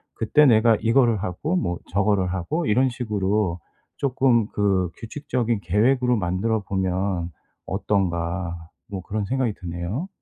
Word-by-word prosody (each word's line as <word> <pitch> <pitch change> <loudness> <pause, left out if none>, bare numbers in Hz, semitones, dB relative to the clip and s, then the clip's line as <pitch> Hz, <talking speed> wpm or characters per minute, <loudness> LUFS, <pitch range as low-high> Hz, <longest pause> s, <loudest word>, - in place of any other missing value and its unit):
그때 150 +7 +4
내가 115 -3 +5
이거를 115 -2 +3
하고 110 - -2
뭐 90 - -1
저거를 100 -1 +1
하고 150 - -2
이런 130 +5 +3
식으로 105 -6 -1 0.4
조금 130 -4 +2
그 95 -3 +1
'규칙적인 120 -2 -2
계획으로 125 +4 +2
만들어 100 +4 0
보면 95 -2 -1 0.3
어떤가?' 85 -3 -2 0.2
뭐 95 -2 -5
그런 105 +2 -3
생각이 130 0 0
드네요. 90 - -4
105 Hz, 280 characters per minute, -23 LUFS, 95-120 Hz, 0.4 s, 내가